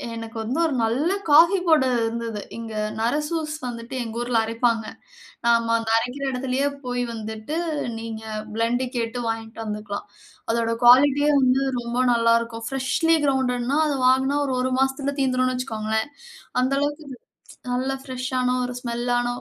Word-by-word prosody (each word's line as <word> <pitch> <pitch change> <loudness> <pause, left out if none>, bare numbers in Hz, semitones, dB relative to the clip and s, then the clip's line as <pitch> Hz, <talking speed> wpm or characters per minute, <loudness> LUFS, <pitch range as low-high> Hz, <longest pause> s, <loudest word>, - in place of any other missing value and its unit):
எனக்கு 225 0 -7
வந்து 240 +7 -2
ஒரு 305 - 0
நல்ல 255 +10 +1 0.2
காஃபி 335 +6 +7
போட 315 -3 +5 0.2
இருந்தது. 225 -2 -3 0.2
இங்க 225 -1 -6 0.3
Narasus 300 +6 -1
வந்துட்டு 235 +1 -6
எங்க 225 0 -7
ஊர்ல 240 -1 0
அரைப்பாங்க. 230 0 0 0.6
நாம 230 -1 +3
அந்த 225 -1 -4
அரைக்கிற 250 +4 -3
இடத்துலேயே 260 +2 0 0.2
போய் 245 0 -1
வந்துட்டு 220 +7 -5 0.4
நீங்க 225 -1 -6 0.3
பிளெண்ட் 230 +3 0
கேட்டு 235 +1 -2
வாயிட்டு 225 0 -4
வந்துக்கலாம். 210 -1 -5 0.4
அதோட 230 0 0
குவாலிட்டியே 285 +4 +6
வந்து 255 +1 +3 0.2
ரொம்ப 235 0 -4 0.2
நல்லாருக்கும். 230 0 +1
ஃப்ரெஷ்லி 270 +5 +2
கிரவுண்டட்னா 260 0 +1
அத 290 - 0
வாங்குன்னா, 265 +2 +3
ஒரு 265 - -1
ஒரு 260 0 0
மாசத்துல 270 +1 0
தீர்ந்திருன்னு 255 -1 +1
வச்சுக்கோங்களேன். 220 -1 -2 0.5
அந்த 260 +2 +1
அளவுக்கு 295 +1 -2
இது, 255 - -8 0.5
நல்ல 255 +2 0
ஃபிரஷ்ஷான 255 -1 -1
ஒரு 250 - -5
ஸ்மெல் 240 0 -3
ஆன 245 - -1
245 Hz, 140 wpm, -23 LUFS, 230-270 Hz, 0.6 s, காஃபி